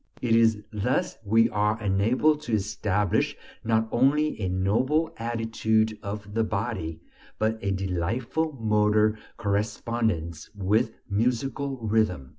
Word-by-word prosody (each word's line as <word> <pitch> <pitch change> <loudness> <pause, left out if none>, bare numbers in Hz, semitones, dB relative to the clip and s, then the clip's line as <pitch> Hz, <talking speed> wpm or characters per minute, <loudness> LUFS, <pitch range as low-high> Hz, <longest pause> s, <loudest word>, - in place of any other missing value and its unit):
It 115 -2 +2
is 110 -2 +3
thus 110 +4 -1
we 115 +2 +4
are 105 +1 +1
enabled 115 +10 +2
to 120 -6 -5
establish 105 - 0 0.3
not 110 -1 +1
only 145 +1 +2
a 95 - 0
noble 120 - +1
attitude 110 -1 0
of 105 0 -6
the 115 +1 +2
body, 100 -7 -3 0.4
but 110 +1 0
a 100 - 0
delightful 100 - -1
motor 105 -2 +2 0.2
correspondence 105 -5 -1
with 105 +3 +1
musical 125 +6 -1
rhythm. 105 -11 +1
110 Hz, 115 wpm, -26 LUFS, 100-115 Hz, 0.4 s, we